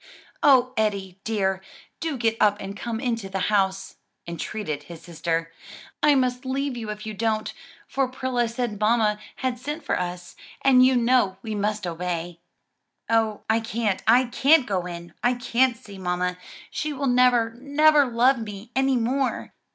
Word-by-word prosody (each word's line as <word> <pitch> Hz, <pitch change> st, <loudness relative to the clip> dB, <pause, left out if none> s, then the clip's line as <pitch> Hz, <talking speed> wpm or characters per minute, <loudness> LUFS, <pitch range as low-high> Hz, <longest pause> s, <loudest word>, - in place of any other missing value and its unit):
"O 255 Hz, -3 st, +5 dB
Eddie, 200 Hz, -3 st, -1 dB
dear, 195 Hz, -4 st, 0 dB, 0.4 s
do 320 Hz, -5 st, -2 dB
get 225 Hz, -2 st, +1 dB
up 205 Hz, -1 st, +4 dB
and 195 Hz, 0 st, -6 dB
come 225 Hz, +1 st, -4 dB
into 230 Hz, -6 st, -2 dB
the 190 Hz, +2 st, -1 dB
house!" 195 Hz, -1 st, 0 dB, 0.3 s
entreated 170 Hz, -2 st, -4 dB
his 160 Hz, +2 st, -12 dB
sister. 165 Hz, 0 st, -3 dB, 0.5 s
"I 295 Hz, -1 st, +5 dB
must 250 Hz, -1 st, 0 dB
leave 270 Hz, 0 st, -2 dB
you 225 Hz, -3 st, -6 dB
if 210 Hz, 0 st, -6 dB
you 215 Hz, -, -5 dB
don't, 215 Hz, +1 st, -1 dB, 0.3 s
for 270 Hz, -1 st, 0 dB
Prilla 255 Hz, -2 st, -1 dB
said 235 Hz, -3 st, -3 dB
mamma 215 Hz, -1 st, +2 dB, 0.2 s
had 255 Hz, -2 st, -2 dB
sent 295 Hz, +5 st, -5 dB
for -, -, 0 dB
us; 175 Hz, 0 st, -5 dB, 0.3 s
and 255 Hz, -2 st, +6 dB
you 260 Hz, 0 st, +5 dB
know 240 Hz, -5 st, +2 dB
we 220 Hz, -2 st, -4 dB
must 210 Hz, 0 st, -1 dB
obey." 175 Hz, 0 st, -4 dB, 0.7 s
"Oh 220 Hz, -2 st, +1 dB
I 220 Hz, +1 st, +3 dB
can't, 225 Hz, -3 st, -2 dB
I 245 Hz, +3 st, +6 dB
can't 270 Hz, +4 st, +4 dB
go 185 Hz, -3 st, -2 dB
in! 170 Hz, -1 st, -8 dB
I 245 Hz, +1 st, +2 dB
can't 245 Hz, 0 st, +1 dB
see 205 Hz, -5 st, -12 dB
mamma! 180 Hz, 0 st, -2 dB, 0.3 s
she 305 Hz, 0 st, -3 dB
will 280 Hz, 0 st, -3 dB
never, 245 Hz, -3 st, +3 dB
never 295 Hz, +2 st, +4 dB
love 250 Hz, +2 st, +3 dB
me 210 Hz, +1 st, -8 dB
any 265 Hz, -1 st, +2 dB
more!" 255 Hz, +3 st, -1 dB
225 Hz, 165 wpm, -24 LUFS, 195-255 Hz, 0.7 s, and